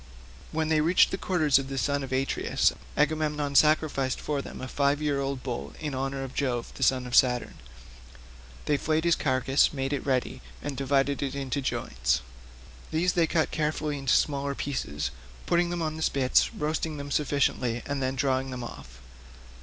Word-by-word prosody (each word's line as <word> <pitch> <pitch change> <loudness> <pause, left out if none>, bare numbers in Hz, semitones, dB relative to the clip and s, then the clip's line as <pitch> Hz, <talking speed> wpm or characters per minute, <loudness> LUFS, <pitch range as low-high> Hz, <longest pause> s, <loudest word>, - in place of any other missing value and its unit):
When 160 0 -1
they 155 -1 +3
reached 170 +4 +4
the - - -1
quarters 155 -7 +3
of 135 0 -5
the 135 - -4
son 140 +1 0
of 135 - -6
Atreus, 135 +1 +1 0.2
Agamemnon 150 -1 +1
sacrificed 150 -3 +3
for 145 -2 -2
them - - -9
a 130 - -5
five 140 +2 +1
year 145 -2 0
old 135 -1 -3
bull 125 -3 -4
in 150 -3 -4
honour 135 +1 -2
of 135 0 -7
Jove 125 -4 -2
the - - -11
son 130 -1 +3
of 125 - -2
Saturn. 125 -2 +3 1.1
They 145 - +2
flayed 155 +2 0
the 170 - +2
carcass, 135 -2 +3
made 135 -1 -2
it 140 - -2
ready, 130 -3 -1 0.2
and 140 - -5
divided 135 +1 +1
it 140 -1 -2
into 140 0 -2
joints; 60 - -1 0.7
these 175 +3 +1
they 170 -2 +3
cut 160 -2 +1
carefully 150 -1 -1
up - - -5
into 135 -2 +1
smaller 140 -1 0
pieces, 75 - -3 0.3
putting 170 - +2
them 175 -1 -2
on 155 0 -2
the - - -6
spits, 135 -4 +2
roasting 155 0 -2
them 140 0 -6
sufficiently, 130 -5 0
and 140 -1 -3
then 130 0 -1
drawing 130 0 0
them 125 -1 -5
off. 60 - -10
140 Hz, 185 wpm, -27 LUFS, 130-150 Hz, 1.1 s, reached